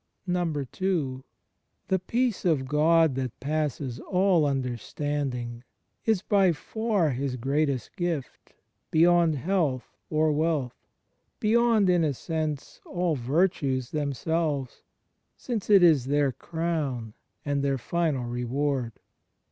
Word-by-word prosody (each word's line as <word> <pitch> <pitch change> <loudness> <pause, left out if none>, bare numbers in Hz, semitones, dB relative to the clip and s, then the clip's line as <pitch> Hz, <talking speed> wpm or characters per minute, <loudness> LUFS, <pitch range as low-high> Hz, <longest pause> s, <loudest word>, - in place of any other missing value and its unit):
n. 175 -2 0 1.3
The 190 - +1
Peace 235 +4 -1
of 150 -7 +1
God 160 +1 +4
that 130 -2 -4
passes 140 -3 -2
all 185 -4 +2
imderstanding 130 -1 -3 0.4
is 220 -4 +2
by 195 -4 +3
far 205 0 0
His 130 0 -2
greatest 135 0 -1
gift, 175 -7 -4 0.3
beyond 170 0 +4
health 155 -5 -1
or 155 0 +2
wealth, 150 -4 0 0.4
— - - -48
beyond, 225 -1 +3
in 175 -2 +3
a 145 -3 0
sense, 155 -1 -4
all 175 -3 -1
virtues 135 -1 0
themselves, 150 -1 -2 0.6
since 230 -6 -4
it 200 -3 +7
is 155 -7 +5
their 145 0 +2
crown 150 -8 -3 0.3
and 145 -1 0
their 140 -1 +1
final 150 -2 -1
reward. 125 +1 -1
150 Hz, 110 wpm, -27 LUFS, 135-175 Hz, 1.3 s, it